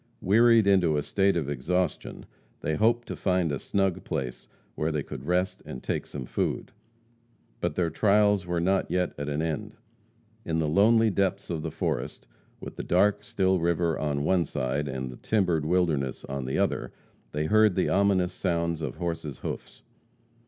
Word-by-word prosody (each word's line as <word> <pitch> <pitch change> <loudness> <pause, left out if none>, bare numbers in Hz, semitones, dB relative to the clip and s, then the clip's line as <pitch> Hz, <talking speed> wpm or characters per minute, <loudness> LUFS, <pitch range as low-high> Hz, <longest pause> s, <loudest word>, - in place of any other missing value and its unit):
Wearied 115 +3 +5
into 90 -6 +3
a 75 - 0
state 100 +2 +2
of 75 -5 -2
exhaustion, 80 +5 -2 0.4
they 80 - -1
hoped 115 +6 +2
to - - -4
find 90 -4 +1
a 70 - -2
snug 95 -3 0
place 60 -2 -4 0.3
where 80 +1 -1
they 75 -2 -1
could - - -8
rest 90 +1 0
and 65 - -8
take - - -2
some 65 -3 -6
food. - - -2 0.9
But - - -2
their 85 -3 0
trials 105 +1 +3
were 85 -1 0
not 95 +3 +1
yet 90 -1 0
at 75 0 -3
an 75 +2 -1
end. 105 +7 -3 0.7
In 80 -1 -1
the 80 -1 +1
lonely 110 +7 +4
depths 95 -1 -1
of 80 -2 -2
the - - -3
forest, - - -3 0.3
with - - -9
the - - -4
dark, 105 +3 +2
still 95 -2 +1
river 85 -1 +1
on 70 -2 -1
one 90 +2 +3
side, 70 0 -2
and 65 -1 -4
the 60 - -11
timbered 90 -8 +1
wilderness 80 -7 0
on 70 -1 -4
the 65 - -2
other, - - 0 0.4
they 75 +1 -1
heard 110 +1 +4
the 95 - +1
ominous 95 -2 +2
sounds 85 -3 -1
of 75 -5 -4
horses' 80 -4 -4
hoofs. - - -6
85 Hz, 175 wpm, -27 LUFS, 75-100 Hz, 0.9 s, Wearied